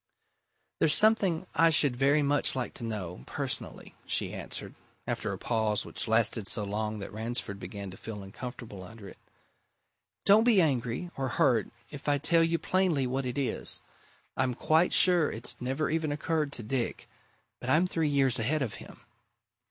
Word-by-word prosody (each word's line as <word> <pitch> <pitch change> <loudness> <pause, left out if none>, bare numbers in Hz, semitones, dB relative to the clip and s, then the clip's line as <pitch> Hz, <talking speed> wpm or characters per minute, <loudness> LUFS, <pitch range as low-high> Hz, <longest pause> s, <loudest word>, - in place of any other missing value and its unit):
"There's 155 - +5
something 205 -6 +3
I 165 0 +5
should 145 -5 +3
very 140 +3 +3
much 145 -1 +1
like 130 -2 -3
to - - -6
know 95 - -5
personally," - - -4
she - - -1
answered, - - -6 0.3
after - - -2
a - - -4
pause 110 -3 0
which - - -4
lasted 110 -2 +2
so 105 - -1
long 105 +1 -3
that 100 - -8
Ransford 110 -2 -3
began 100 +1 -7
to 95 - -11
feel 105 -3 -7
uncomfortable 110 0 -8
under 100 +2 -11
it. - - -13 1.1
"Don't 210 +2 +6
be 230 -4 +5
angry 135 +1 0
or 135 -1 -1
hurt 125 -3 +2 0.2
if 145 0 -5
I 145 - +3
tell 165 +3 +3
you 165 +1 +1
plainly 180 -7 +1
what 130 +1 -2
it 125 - -4
is. 140 -2 +1 0.5
I'm 130 -2 0
quite 160 +7 +2
sure 175 -4 +5
it's 115 +2 -1
never 135 +5 -1
even 160 -2 0
occurred 150 0 -1
to 120 - -2
Dick 120 +2 -3 0.5
but 125 - -6
I'm 155 +6 +4
three 165 -4 0
years 135 -3 +2
ahead 140 +6 0
of 110 -6 -4
him. - - -13
130 Hz, 170 wpm, -29 LUFS, 110-155 Hz, 1.1 s, Don't